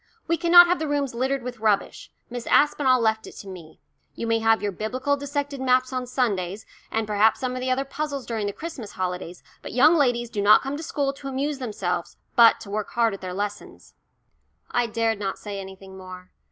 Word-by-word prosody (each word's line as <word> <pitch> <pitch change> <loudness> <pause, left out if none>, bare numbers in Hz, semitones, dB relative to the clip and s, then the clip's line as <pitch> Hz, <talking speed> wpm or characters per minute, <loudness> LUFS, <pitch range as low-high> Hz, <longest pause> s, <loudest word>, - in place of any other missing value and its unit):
"We 335 - +2
cannot 350 +1 +8
have 355 +1 +1
the 315 - -2
rooms 285 -3 -1
littered 260 +2 -1
with 250 -1 -6
rubbish. 215 -2 -1 0.2
Miss 245 0 -7
Aspinall 275 -3 +4
left 220 -1 0
it - - -11
to 200 - -10
me. 170 -4 -11 0.4
You - - -4
may 225 0 +1
have 225 0 +3
your 205 - 0
Biblical 255 +8 -1
dissected 285 -1 -4
maps 255 0 +2
on 255 -1 -3
Sundays, 210 -6 -1 0.2
and 225 0 -1
perhaps 215 +1 +3
some 255 -1 -2
of 255 - -4
the 255 +1 -2
other 265 +2 0
puzzles 285 -1 -4
during 220 -3 -2
the - - -1
Christmas 270 -5 -8
holidays, 180 -1 -4 0.2
but - - -8
young 280 +7 +6
ladies 245 -6 +1
do 205 - -2
not 205 +1 +6
come 275 +1 -3
to 300 - -6
school 285 -3 -2
to 275 0 -9
amuse 275 +2 -2
themselves, 185 -8 -3 0.2
but 230 -1 +7
to 200 - -9
work 210 0 -3
hard 230 -3 +2
at 195 - -8
their 185 -1 -5
lessons." 205 +2 -6 0.8
I 245 -1 +1
dared 225 -1 -1
not 195 -2 -3
say 205 -2 -6
anything 190 0 -10
more. 185 0 -11
235 Hz, 210 wpm, -24 LUFS, 205-275 Hz, 0.8 s, cannot